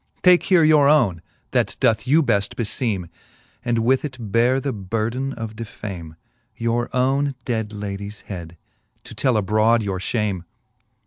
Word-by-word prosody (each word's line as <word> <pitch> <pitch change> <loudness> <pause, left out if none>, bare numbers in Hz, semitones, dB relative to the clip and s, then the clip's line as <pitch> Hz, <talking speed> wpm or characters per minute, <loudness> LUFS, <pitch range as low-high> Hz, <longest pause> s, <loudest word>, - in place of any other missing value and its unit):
Take 180 -1 +7
here 180 -4 +4
your 155 -2 +5
owne, 120 - +3 0.3
that - - 0
doth 110 +2 +2
you 155 +5 +5
beft 105 -6 0
befeeme, 110 -5 -1 0.6
And 120 -1 0
with 130 +2 +3
it 130 -8 -6
beare 120 +4 +3
the 135 0 -2
burden 115 +6 -2
of 115 -3 -6
defame; 95 -7 -7 0.4
Your 115 +1 -1
owne 135 +2 +1
dead 110 -3 -2
ladies 100 0 -6
head, 85 -4 -8 0.5
to - - -11
tell 130 -5 +1
abrode 110 +3 +3
your 95 -2 -2
fliame. 100 -3 -1
115 Hz, 145 wpm, -22 LUFS, 100-130 Hz, 0.6 s, Take